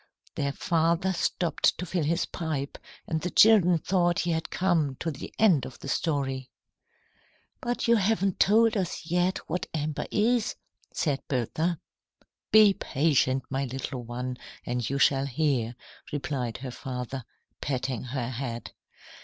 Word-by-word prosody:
Their 140 -1 -1
father 170 +4 +1
stopped 170 -2 +1
to 180 - -4
fill 175 -1 -1
his 170 +4 +1
pipe, 155 -5 -4 0.3
and 160 -1 -2
the 180 - -2
children 185 -4 +6
thought 175 +1 +1
he 175 - 0
had 160 0 -2
come 165 -7 +1
to 165 - -3
the 140 - -8
end 185 - +4
of 130 - -7
the - - -9
story. 135 -5 -1 1.1
"But 240 0 -1
you 235 0 +6
haven't 200 -2 +1
told 225 +3 +5
us 185 -5 -2
yet 175 +2 +1
what 175 +2 -2
amber 150 -1 -2
is," 225 +1 +1 0.4
said 145 -4 -1
Bertha. 155 +6 -1 0.7
"Be 215 -2 +8
patient, 135 -5 +1
my 135 +1 0
little 130 0 -4
one, 125 +2 -4 0.3
and 120 -1 -2
you 140 - -1
shall 135 0 +3
hear," 130 -4 0 0.4
replied 135 -5 -2
her 130 - -4
father, 125 0 -5 0.4
patting 130 -3 -2
her 125 -1 -3
head. 120 -2 -5
155 Hz, 145 wpm, -28 LUFS, 130-180 Hz, 1.1 s, Be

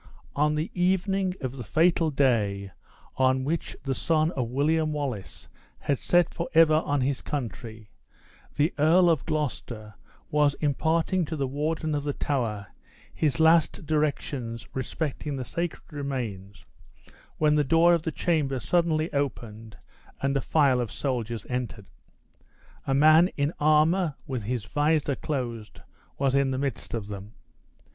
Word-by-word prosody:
On 150 +1 +2
the 155 +3 -2
evening 185 +1 +1
of 130 0 -4
the 125 - -5
fatal 165 - +2
day 105 -9 +1 0.5
in 130 0 +3
which 160 +5 -3
the 135 - -1
sun 155 +4 +1
of 130 -8 -2
William 155 +4 +1
Wallace 135 -10 -5 0.3
had 140 -3 -1
set 175 -1 +2
forever 160 -2 +3
on 145 -1 0
his 135 +1 -1
country, 115 -5 -6 0.6
the 150 +3 +1
Earl 170 +4 +5
of 155 -5 0
Gloucester 125 -8 -3 0.4
was 145 -1 +3
imparting 160 +5 +1
to 160 - -4
the 140 -3 -1
Warden 155 +3 -2
of 145 -1 -1
the 145 -1 -2
Tower 115 -10 -2 0.5
his 145 -6 0
last 160 -1 +4
directions 140 -6 -2
respecting 145 +2 -3
the 130 -2 -4
sacred 170 +6 -4
remains, 120 -9 -5 0.7
when 150 -1 +3
the 150 -1 +3
door 165 +5 +5
of 170 - +2
the 160 - -3
chamber 150 -6 0
suddenly 160 +3 +1
opened, 115 -6 -4 0.4
and 135 0 0
a 140 - +1
file 135 -5 +3
of 120 - -4
soldiers 120 -5 -3
entered. 125 -5 -4 1.0
A 135 - +2
man 155 +4 +6
in 145 +3 0
armor, 155 +2 +3
with 130 -3 -3
his 120 -1 -2
visor 145 +3 +1
closed, 120 -8 -5 0.4
was 135 -1 +1
in 140 -1 +3
the 130 - -1
midst 135 -4 -3
of 110 -3 -4
them. 100 +1 -8
145 Hz, 145 wpm, -26 LUFS, 125-160 Hz, 1.0 s, man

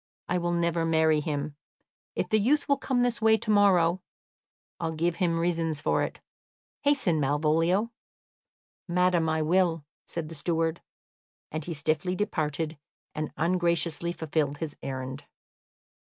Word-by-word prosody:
I 180 - +1
will 175 0 -1
never 170 -1 +1
marry 160 -1 +3
him. 145 -1 -3 0.6
If - - -1
the 215 - +3
youth 280 +8 +2
will 280 - +3
come 245 -2 +1
this 245 -2 0
way 220 0 +5
to 215 - -2
morrow, 185 -4 +4 0.8
I 165 - -1
will 160 - -4
give 170 +2 0
him 170 -3 +1
reasons 165 -3 0
for - - +1
it. - - -3 0.6
Hasten, 270 - +2
Malvolio." 160 +9 +2 1.0
"Madam, 175 -2 +2
I 160 0 +1
will," 165 -2 +2 0.2
said 165 -2 -3
the 165 - -8
steward; 165 +2 -1 0.7
and 155 -1 -4
he 170 - -4
stiffly 155 +5 0
departed, 160 -5 -2 0.3
and 155 0 -3
ungraciously 170 0 +1
fulfilled 155 -3 -1
his 155 -1 -5
errand. 130 +1 -5
165 Hz, 140 wpm, -28 LUFS, 155-180 Hz, 1.0 s, way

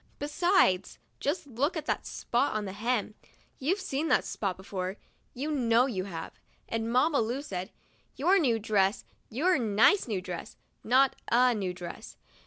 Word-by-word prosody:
Besides, 295 - +2 0.2
just 290 +3 -1
look 285 +6 -1
at 305 - -4
that - - -2
spot 245 +4 0
on 215 -1 -2
the 190 - -5
hem. 215 +1 -1 0.5
You've 340 +10 0
seen 320 -5 -2
that - - +3
spot 195 -4 -3
before 190 0 -5 0.2
— - - -40
you 285 +5 -3
know 245 -4 +3
you 195 -8 -3
have. 165 -4 -7 0.3
And 225 0 -2
Mamma 280 +4 +3
Lu 245 +5 -2
said: 185 -5 -5 0.2
* - - -38
Your 365 +8 +4
new 245 -9 +2
dress, 205 -2 +1 0.2
your 310 +7 +2
nice 225 - +4
new 210 -5 -1
dress;* 180 -1 -7 0.3
not 265 +4 +4 0.2
'a 250 +1 +5
new 195 -5 -2
dress.' 175 -1 -9
235 Hz, 170 wpm, -29 LUFS, 200-285 Hz, 0.5 s, a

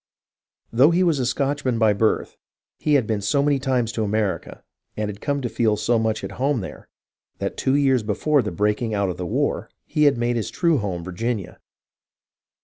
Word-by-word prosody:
Though 130 +6 +6
he 175 +2 +3
was 165 -6 +2
a 125 - 0
Scotchman 135 -1 0
by 110 -2 +4
birth, 110 +2 0 0.4
he 150 -1 +2
had 130 -5 +3
been 105 -2 -1
so 125 +8 +1
many 145 -1 +2
times 130 -4 0
to 110 - -2
America, 105 -1 -2 0.3
and 105 -1 -1
had 105 0 -8
come 140 -2 -1
to - - 0
feel 110 -3 +1
so 120 +1 +1
much 110 -1 -1
at 95 - -5
home 135 -3 +1
there, 95 - -9 0.5
that - - -3
two 130 - +1
years 135 -3 +3
before 135 +8 +1
the 105 - -3
breaking 105 +2 0
out 100 -2 +1
of 90 - -8
the 90 -1 -4
war, - - -1 0.2
he 150 - +1
had 140 -4 +4
made 120 0 0
his 110 - -2
true 165 -5 +2
home 95 -5 -3
in - - -10
Virginia. 105 +2 -3
115 Hz, 205 wpm, -23 LUFS, 105-140 Hz, 0.5 s, Though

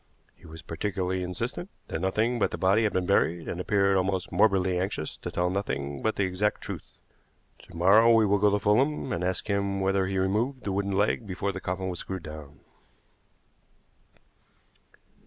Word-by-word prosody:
He - - -17
was 80 +1 -11
particularly 95 +1 -2
insistent 90 -1 -4 0.2
that 80 - -3
nothing 110 +6 0
but - - +2
the - - -5
body 100 +4 +3
had 105 - +1
been 90 -1 0
buried, 85 -3 +1
and 90 - -3
appeared 100 0 +2
almost 95 -1 -1
morbidly 95 -2 +2
anxious 90 -5 -3
to - - -6
tell 90 +1 0
nothing 70 -8 -3
but 110 - 0
the 100 - +1
exact 95 +3 0
truth. - - -8 0.7
To 90 - -13
morrow 105 +7 +6
we 115 -1 +5
will 100 0 +2
go 105 +1 +4
to 100 - +2
Fulham 130 +8 +1
and 85 - -2
ask 90 0 -1
him 100 -1 0
whether 95 0 +1
he 95 0 -2
removed 110 +8 0
the 100 - -2
wooden 100 0 -1
leg 105 +2 +1
before 100 +1 -2
the 95 0 -7
coffin 95 +1 -3
was 90 -2 -3
screwed 95 -3 -5
down." 75 -2 -10
95 Hz, 180 wpm, -27 LUFS, 90-105 Hz, 0.7 s, morrow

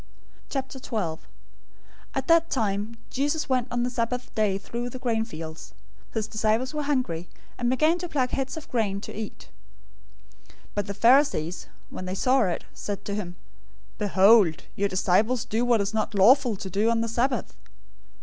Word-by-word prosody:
012:001 230 - -3 1.0
At 270 - -1
that 335 0 +4
time, 215 -1 -1
Jesus 290 +4 0
went 255 -3 +1
on 240 0 -1
the 245 - 0
Sabbath 245 +1 -2
day 210 -3 +1
through 235 +4 -5
the 255 - -7
grain 230 -3 0
fields. 160 - -8 0.4
His 220 -1 0
disciples 220 +5 0
were 300 - -1
hungry 250 - -1 0.3
and 240 0 +1
began 310 +7 +3
to 355 0 -5
pluck 260 -5 0
heads 270 +3 -2
of 315 - -8
grain 220 -5 +1
and 200 - -6
to - - -7
eat. 215 0 -7 1.0
012:002 100 - -21 0.2
But 205 0 -2
the 200 - -4
Pharisees, 230 - +3 0.2
when 185 - -6
they 185 +1 -3
saw 255 +6 +3
it, 180 - -2
said 205 -1 -5
to 200 - -3
him, 185 -4 -4 0.6
"Behold, 200 -3 +5
your 200 0 0
disciples 205 +6 +2
do 225 +3 0
what 240 -3 +3
is 200 +2 -2
not 220 -1 -1
lawful 240 +4 +5
to 195 0 -6
do 210 +5 +2
on 230 -1 +2
the 230 - 0
Sabbath." 245 +3 -1
225 Hz, 170 wpm, -26 LUFS, 200-255 Hz, 1.0 s, Behold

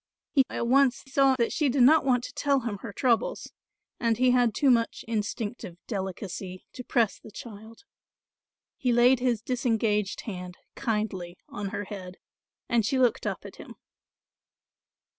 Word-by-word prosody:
He 275 - +5
at - - -2
once 270 0 +3
saw 270 0 +3
that 235 -2 0
she 295 -3 +1
did 260 0 +3
not 310 +5 +6
want 250 -3 +2
to 280 - -7
tell 280 -2 +1
him 220 -4 -4
her 230 - -7
troubles 235 +1 0 0.5
and 230 -2 +1
he 255 +1 +4
had 245 -3 +3
too 275 -3 +4
much 230 -2 0
instinctive 215 -4 -4
delicacy 190 -2 -5
to 250 - -7
press 235 -4 +1
the - - -13
child. 220 - -11 0.9
He 250 - 0
laid 240 +2 +5
his 245 -4 0
disengaged 225 -5 0
hand 180 -4 -7 0.2
kindly 210 -7 -3
on 205 -1 -5
her 205 0 -4
head, 185 -2 -8 0.5
and 235 -2 +2
she 245 +6 0
looked 250 -2 +2
up - - -4
at - - -10
him. - - -11
230 Hz, 160 wpm, -27 LUFS, 205-255 Hz, 0.9 s, not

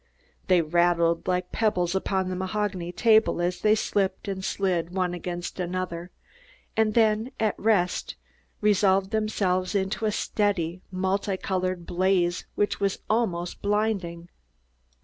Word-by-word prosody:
They 180 -3 +4
rattled 170 +1 +2
like 180 0 -1
pebbles 180 -6 +1
upon 190 0 0
the 185 - -3
mahogany 190 -2 -2
table 220 +1 +3
as 175 +1 -1
they 215 0 +4
slipped 195 -3 -1
and 190 -1 -3
slid 180 -4 0
one 180 -1 -1
against 175 +1 -5
another, 180 -1 -3 0.7
and 220 -1 +2
then, 220 +1 +3
at 215 -2 +2
rest, 200 -5 +1 0.5
resolved 195 -2 +3
themselves 205 -4 0
into 195 +3 -1
a 215 - +2
steady, 185 -5 -1
multi 190 +1 -1
colored 185 -2 -2
blaze 180 -1 +1
which 205 - 0
was 200 -1 0
almost 180 -6 -1
blinding. 200 -5 -1
190 Hz, 130 wpm, -26 LUFS, 175-205 Hz, 0.7 s, They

